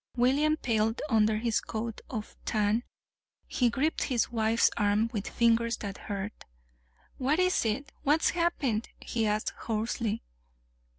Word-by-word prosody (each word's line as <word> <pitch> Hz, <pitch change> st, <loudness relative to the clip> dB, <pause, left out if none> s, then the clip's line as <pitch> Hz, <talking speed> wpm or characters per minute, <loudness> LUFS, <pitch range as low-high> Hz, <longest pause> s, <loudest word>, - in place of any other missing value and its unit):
William 280 Hz, +5 st, +3 dB
paled 225 Hz, -3 st, 0 dB
under 215 Hz, -1 st, +4 dB
his 225 Hz, 0 st, 0 dB
coat 225 Hz, 0 st, -5 dB
of 215 Hz, -4 st, -5 dB
tan. 215 Hz, +1 st, +1 dB, 0.6 s
He 245 Hz, -2 st, +1 dB
gripped 280 Hz, +7 st, 0 dB
his 245 Hz, -4 st, 0 dB
wife's 225 Hz, 0 st, +3 dB
arm 210 Hz, +2 st, +2 dB
with 205 Hz, -3 st, -3 dB
fingers 230 Hz, 0 st, +2 dB
that 200 Hz, -1 st, -6 dB
hurt. 200 Hz, 0 st, -5 dB, 0.8 s
"What 275 Hz, +4 st, +2 dB
is 365 Hz, -7 st, +2 dB
it 270 Hz, +6 st, -1 dB
what's 300 Hz, +2 st, +3 dB
happened?" 285 Hz, -10 st, 0 dB
he 225 Hz, -2 st, -1 dB
asked 210 Hz, +1 st, 0 dB
hoarsely. 225 Hz, 0 st, -2 dB
230 Hz, 130 wpm, -29 LUFS, 215-260 Hz, 0.8 s, under